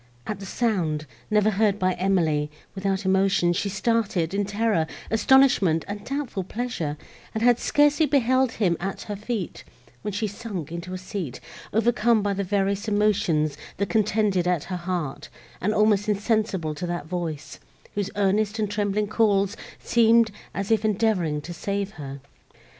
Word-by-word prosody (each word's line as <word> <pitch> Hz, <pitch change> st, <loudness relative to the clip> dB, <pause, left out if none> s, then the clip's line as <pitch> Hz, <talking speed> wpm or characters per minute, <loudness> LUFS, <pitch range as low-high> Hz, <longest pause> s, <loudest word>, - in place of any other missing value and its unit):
At 200 Hz, +5 st, -4 dB
the 195 Hz, -, -7 dB
sound, 175 Hz, -10 st, 0 dB, 0.2 s
never 210 Hz, 0 st, +3 dB
heard 205 Hz, 0 st, +2 dB
by 185 Hz, -2 st, +1 dB
Emily, 170 Hz, -6 st, +1 dB, 0.2 s
without 195 Hz, 0 st, -1 dB
emotion, 190 Hz, -2 st, +3 dB
she 200 Hz, +3 st, -1 dB
started, 200 Hz, -4 st, 0 dB
in 200 Hz, 0 st, 0 dB
terror, 205 Hz, -5 st, +1 dB, 0.2 s
astonishment 225 Hz, -, +4 dB
and 205 Hz, 0 st, -5 dB
doubtful 270 Hz, -8 st, -3 dB
pleasure, 185 Hz, -8 st, -3 dB, 0.4 s
and 220 Hz, -, -1 dB
had 245 Hz, -1 st, +5 dB
scarcely 295 Hz, +1 st, +3 dB
beheld 260 Hz, -2 st, +2 dB
him 185 Hz, -6 st, +1 dB
at 195 Hz, +2 st, -4 dB
her 205 Hz, -, -5 dB
feet, 210 Hz, -2 st, -4 dB, 0.4 s
when 210 Hz, -, -3 dB
she 205 Hz, +3 st, -1 dB
sunk 200 Hz, -6 st, -5 dB
into 170 Hz, +2 st, -5 dB
a -, -, -3 dB
seat, 185 Hz, -, -5 dB, 0.3 s
overcome 230 Hz, 0 st, +3 dB
by 205 Hz, -1 st, +1 dB
the 200 Hz, +1 st, -2 dB
various 200 Hz, +1 st, 0 dB
emotions, 205 Hz, -8 st, +2 dB, 0.2 s
that 200 Hz, -1 st, -1 dB
contended 210 Hz, -3 st, +2 dB
at 180 Hz, -4 st, +1 dB
her 185 Hz, -, -5 dB
heart, 175 Hz, -5 st, -4 dB, 0.3 s
and 195 Hz, +5 st, +1 dB
almost 210 Hz, -1 st, +3 dB
insensible 205 Hz, -6 st, 0 dB
to 165 Hz, +4 st, -5 dB
that 175 Hz, -3 st, -3 dB
voice, 160 Hz, -4 st, -5 dB, 0.3 s
whose 200 Hz, -1 st, -2 dB
earnest 205 Hz, +2 st, +1 dB
and 210 Hz, -2 st, -1 dB
trembling 205 Hz, 0 st, 0 dB
calls 205 Hz, -1 st, +2 dB, 0.2 s
seemed 230 Hz, -1 st, +4 dB, 0.2 s
as 200 Hz, +2 st, -2 dB
if 220 Hz, -1 st, +3 dB
endeavouring 200 Hz, -8 st, +1 dB
to 175 Hz, +4 st, -7 dB
save 200 Hz, +3 st, -3 dB
her. 140 Hz, -6 st, -8 dB
200 Hz, 155 wpm, -25 LUFS, 180-215 Hz, 0.4 s, had